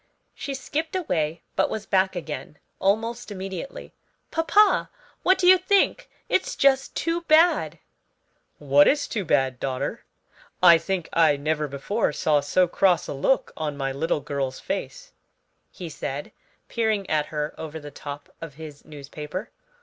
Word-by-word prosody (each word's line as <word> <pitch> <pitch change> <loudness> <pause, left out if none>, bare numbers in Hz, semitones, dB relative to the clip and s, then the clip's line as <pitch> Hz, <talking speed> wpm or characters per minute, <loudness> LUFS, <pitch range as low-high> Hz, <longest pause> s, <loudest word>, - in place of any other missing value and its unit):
She 275 - -5
skipped 315 +5 -3
away, 165 - -1
but - - +2
was 215 -1 -4
back 190 -1 +2
again 150 -4 -6 0.2
almost 225 +5 0
immediately. 195 +4 -7 0.4
"Papa, 410 +6 +3 0.3
what 375 +1 +4
do 360 - 0
you 370 +1 +8
think? 400 +6 +2 0.2
It's 375 - 0
just 270 -1 +2
too 335 +1 -1
bad!" 310 - +4 0.8
"What 145 0 +5
is 290 0 +2
too 210 - -2
bad, 135 -5 +1
daughter? 130 -1 -3 0.6
I 170 -2 +7
think 190 -2 -3
I 155 -3 +4
never 150 +1 -1
before 145 - -1
saw 150 0 +2
so 180 +6 +2
cross 180 -1 +2
a - - -4
look 140 - +1
on 150 -2 -3
my 135 -1 -2
little 145 +2 -1
girl's 135 -2 -3
face," - - -5 0.6
he 180 - -8
said, 145 -2 -5 0.4
peering 220 -4 0
at 150 -1 0
her 150 -1 -3
over 160 0 -7
the 145 -1 -10
top 145 +1 -8
of 165 -4 -8
his 150 -2 -10
newspaper. 150 - -7
165 Hz, 150 wpm, -25 LUFS, 145-235 Hz, 0.8 s, you